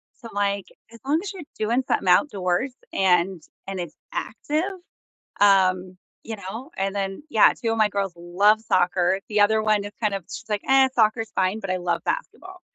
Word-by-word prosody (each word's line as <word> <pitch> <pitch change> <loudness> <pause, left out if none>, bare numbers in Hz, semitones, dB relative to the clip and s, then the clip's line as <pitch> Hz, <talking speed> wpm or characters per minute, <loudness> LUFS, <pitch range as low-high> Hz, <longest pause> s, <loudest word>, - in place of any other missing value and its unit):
So 230 - -11
I'm - - -15
like, 200 -1 0 0.3
as 230 - -13
long 295 +4 +2
as 410 0 -6
you're 380 - -8 0.2
doing 235 +4 +1
something - - 0
outdoors 190 +3 +2 0.2
and 180 -1 +2 0.3
and 195 -1 -4
it's 170 -3 -6 0.2
active, 365 -1 -3 0.6
um, 185 -2 +3 0.3
you 225 -1 -5
know, 220 - -8
and 195 +1 -1
then, 195 +6 -3
yeah, 220 - +5
2 225 -1 0
of 225 - -1
my 215 -1 +3
girls 200 -2 -2
love 200 +5 +3
soccer. 180 -2 +2
The 210 0 +2
other 220 +1 +4
one 215 -1 +2
is 205 - -7
kind 210 -2 +1
of, 195 - -5
she's - - -7
like, 210 -1 -1
"Eh, 265 0 +6
soccer's 220 0 +2
fine, 190 +4 +1
but 195 - -6
I 185 - 0
love 175 -1 -2
basketball." 375 -7 -4
205 Hz, 195 wpm, -24 LUFS, 185-230 Hz, 0.6 s, Eh